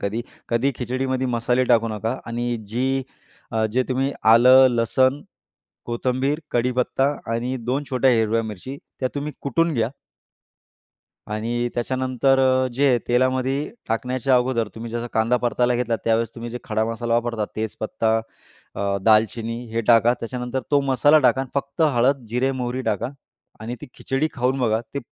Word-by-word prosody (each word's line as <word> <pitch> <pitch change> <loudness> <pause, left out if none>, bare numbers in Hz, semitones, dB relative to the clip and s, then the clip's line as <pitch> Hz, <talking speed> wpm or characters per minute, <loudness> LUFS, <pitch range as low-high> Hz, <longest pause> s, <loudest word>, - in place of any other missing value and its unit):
कधी 105 +4 -2 0.3
कधी 120 +4 +1
खिचडीमध्ये 130 +1 -2
मसाले 125 +1 +1
टाकू 115 -2 +3
नका. 110 +3 -3
आणि 120 +1 -2
जी 130 +4 0 0.5
अ, 110 -1 +1
जे 130 +2 +2
तुम्ही 135 +2 0 0.2
आलं, 125 +3 +8
लसूण, 130 +4 +2 0.7
कोथिंबीर, 130 +5 -1
कढीपत्ता 125 +2 +1 0.3
आणि 120 +3 -2
2 135 +3 0
छोट्या 130 0 +3
हिरव्या 115 -1 +2
मिरच्या 110 +5 -7 0.2
त्या 130 - +1
तुम्ही 145 +1 -3
कुटून 165 +5 +1
घ्या 115 0 0 1.4
आणि 115 +3 -2
त्याच्यानंतर 130 +2 +1
अ, 130 0 +3
जे 140 +3 +2
हे 120 - +3
तेलामध्ये 130 +3 +1 0.2
टाकण्याच्या 125 +3 +1
अगोदर 125 -3 0
तुम्ही 115 +1 -7
जसा 120 +1 -3
कांदा 115 +2 +2
परतायला 125 0 +1
घेतला, 120 -1 0
त्यावेळेस 115 0 +1
तुम्ही 120 0 -7
जे 125 - -5
खडा 110 -3 0
मसाला 115 +1 -2
वापरता. 120 -2 0
तेजपत्ता, 110 +1 -1 0.6
अ, 100 0 -1
दालचिनी 115 +2 +2
हे 115 - 0
टाका. 120 +1 +5
त्याच्यानंतर 125 +2 -3
तो 145 -1 +4
मसाला 140 +3 +4
टाका 130 -2 +3
आणि 135 -1 -5
फक्त 140 +2 -3
हळद, 135 -3 +2
जिरे, 125 +4 0
मोहरी 125 0 -3
टाका 105 -4 -1 0.5
आणि 115 +3 -5
ती - - -8
खिचडी 135 +4 -1
खाऊन 130 +1 0
बघा 110 -3 +1
ते 140 - -2
125 Hz, 155 wpm, -22 LUFS, 115-130 Hz, 1.4 s, आलं